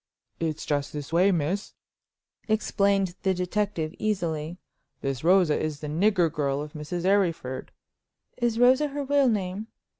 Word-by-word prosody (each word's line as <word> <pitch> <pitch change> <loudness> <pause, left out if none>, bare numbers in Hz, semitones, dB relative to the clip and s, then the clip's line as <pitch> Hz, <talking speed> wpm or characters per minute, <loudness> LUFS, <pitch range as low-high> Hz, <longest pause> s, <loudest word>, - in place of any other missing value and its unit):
"It's 160 -2 -2
just 145 -1 -1
this 150 +1 -6
way, 185 +4 +5
miss," 175 +4 -1 0.7
explained 200 -3 +1
the 190 -1 +1
detective, 180 -3 -1
easily. 170 -6 -2 0.4
"This 135 -1 -3
Rosa 175 -4 +4
is 155 -2 -3
the 150 - -4
nigger 175 +1 +2
girl 140 -3 0
of 150 0 -6
Mrs. 160 +4 -4
Arryford—" 170 -10 +1 0.7
"Is 240 -2 0
Rosa 255 +5 +5
her 285 0 -4
real 280 -1 +3
name?" 200 0 -2
180 Hz, 140 wpm, -26 LUFS, 155-205 Hz, 0.7 s, way